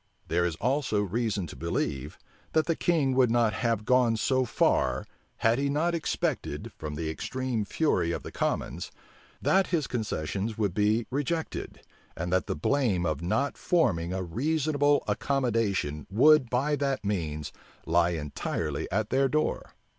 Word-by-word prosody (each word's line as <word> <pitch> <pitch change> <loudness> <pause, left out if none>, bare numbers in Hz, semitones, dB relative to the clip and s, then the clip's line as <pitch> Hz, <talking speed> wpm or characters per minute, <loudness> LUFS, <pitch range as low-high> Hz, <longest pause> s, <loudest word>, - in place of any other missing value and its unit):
There 85 +1 +2
is 85 -3 -1
also 125 - 0
reason 105 -1 -1
to 80 - -9
believe, 65 -3 -3 0.4
that 160 0 +3
the 165 - +1
king 155 -7 +1
would 130 -2 +4
not 115 -2 +3
have 115 -3 -1
gone 125 -2 +3
so 130 +3 +1
far, - - +1 0.3
had 115 +3 +2
he 140 0 +1
not 160 +5 +1
expected, 165 -2 -2
from 75 -1 -6
the 80 +1 -3
extreme 125 +7 -2
fury 100 - +1
of - - -3
the - - -7
commons, - - -2 0.5
that 190 0 +3
his 160 -5 0
concessions 105 -2 -3
would 100 -5 0
be 105 +3 +2
rejected, 145 +4 -3 0.4
and 85 +2 -2
that 95 - +1
the - - -1
blame 100 - +1
of 80 -2 -1
not 110 +11 -1
forming 90 - +1
a 95 0 -2
reasonable 145 - +1
accommodation 115 - 0
would 130 +5 +5
by 140 +5 +1
that 140 -5 -1
means 80 -7 -2 0.3
lie 85 +1 +3
entirely 75 -4 -3
at 105 +3 -1
their 135 +1 +3
door. 155 +2 -1
115 Hz, 155 wpm, -28 LUFS, 90-140 Hz, 0.5 s, would